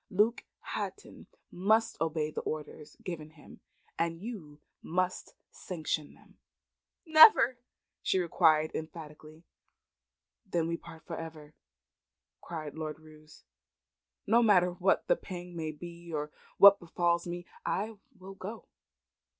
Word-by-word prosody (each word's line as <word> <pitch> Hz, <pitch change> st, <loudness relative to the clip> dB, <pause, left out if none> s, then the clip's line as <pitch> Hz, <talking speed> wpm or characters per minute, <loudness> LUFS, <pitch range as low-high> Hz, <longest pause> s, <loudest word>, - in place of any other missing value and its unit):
Luke 210 Hz, +5 st, +2 dB, 0.2 s
Hatton 415 Hz, -, -6 dB, 0.2 s
must 220 Hz, +5 st, +2 dB
obey 155 Hz, -1 st, 0 dB
the -, -, -4 dB
orders 150 Hz, 0 st, -6 dB
given 155 Hz, -4 st, -6 dB
him. 155 Hz, -2 st, -16 dB, 0.4 s
And 165 Hz, 0 st, -1 dB
you 180 Hz, -9 st, -8 dB, 0.2 s
must 185 Hz, +2 st, -2 dB, 0.2 s
sanction 155 Hz, -4 st, -4 dB
them." -, -, -23 dB, 0.7 s
"Never!" 310 Hz, -, +8 dB, 0.4 s
she -, -, +1 dB
exclaimed, 155 Hz, -3 st, +3 dB
emphatically. 155 Hz, 0 st, -8 dB, 1.0 s
"Then 165 Hz, -2 st, -1 dB
we 170 Hz, -, -1 dB
part 165 Hz, -1 st, -13 dB
for -, -, -5 dB
ever," 155 Hz, -2 st, -9 dB, 0.9 s
cried 155 Hz, -3 st, -6 dB
Lord 155 Hz, -1 st, -5 dB
Roos. 155 Hz, 0 st, -17 dB, 0.8 s
"No 230 Hz, +3 st, +4 dB
matter 185 Hz, -6 st, +5 dB
what 180 Hz, +2 st, +1 dB
the -, -, +4 dB
pang 180 Hz, -, -8 dB
may 160 Hz, -2 st, -3 dB
be 170 Hz, +2 st, -10 dB
nor 150 Hz, -2 st, -3 dB, 0.3 s
what 200 Hz, 0 st, +9 dB
befals 170 Hz, 0 st, 0 dB
me 175 Hz, 0 st, -5 dB, 0.2 s
I 215 Hz, +4 st, -2 dB, 0.2 s
will 190 Hz, +1 st, -10 dB
go. 200 Hz, +4 st, -8 dB
170 Hz, 120 wpm, -31 LUFS, 155-190 Hz, 1.0 s, what